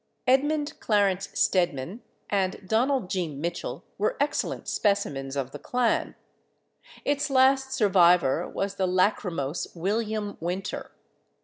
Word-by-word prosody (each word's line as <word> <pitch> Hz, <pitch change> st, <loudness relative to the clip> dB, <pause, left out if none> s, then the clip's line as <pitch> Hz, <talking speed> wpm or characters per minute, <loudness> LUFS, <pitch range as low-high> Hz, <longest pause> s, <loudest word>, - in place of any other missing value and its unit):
Edmund 290 Hz, +3 st, +1 dB
Clarence 195 Hz, -3 st, +1 dB
Stedman 175 Hz, -, +1 dB, 0.3 s
and 190 Hz, -1 st, -1 dB
Donald 245 Hz, 0 st, +1 dB
G. 185 Hz, -2 st, -1 dB
Mitchell 160 Hz, +4 st, -4 dB, 0.2 s
were 210 Hz, -, 0 dB
excellent 285 Hz, +1 st, -1 dB
specimens 140 Hz, -10 st, 0 dB
of 135 Hz, -2 st, -2 dB
the -, -, -8 dB
clan; 245 Hz, -2 st, 0 dB, 0.9 s
its 285 Hz, +1 st, 0 dB
last 265 Hz, 0 st, +4 dB
survivor 180 Hz, -, +4 dB
was 200 Hz, 0 st, -3 dB
the 190 Hz, -, +1 dB
lachrymose 180 Hz, -5 st, 0 dB
William 210 Hz, +3 st, -2 dB
Winter. 180 Hz, +3 st, -4 dB
200 Hz, 110 wpm, -26 LUFS, 175-245 Hz, 0.9 s, last